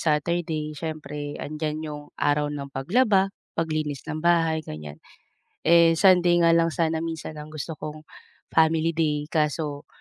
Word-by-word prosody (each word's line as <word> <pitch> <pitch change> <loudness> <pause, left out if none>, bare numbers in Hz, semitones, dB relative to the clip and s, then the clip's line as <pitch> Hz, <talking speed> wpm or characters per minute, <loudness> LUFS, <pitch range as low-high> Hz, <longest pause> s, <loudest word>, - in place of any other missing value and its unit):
Saturday 155 0 0
siyempre 150 -1 -5
andiyan 155 +1 -4
'yong 150 -1 -6
araw 145 0 +1
ng 140 -2 -6
paglaba, 195 - +2 0.2
paglinis 155 -3 -2
ng 155 +1 -4
bahay, 165 -2 +2
ganiyan. 75 -1 -8 0.7
Eh, 165 0 +6
Sunday 175 -1 +5
nga 170 - +5
lang 165 -1 +3
sana 165 -1 +1
minsan 160 -1 -5
ang 150 - -7
gusto 155 +1 -5
kong 155 0 -7 0.5
family 160 0 +3
day, 150 -2 -1
kaso 150 -1 -1
155 Hz, 140 wpm, -25 LUFS, 150-165 Hz, 0.7 s, Eh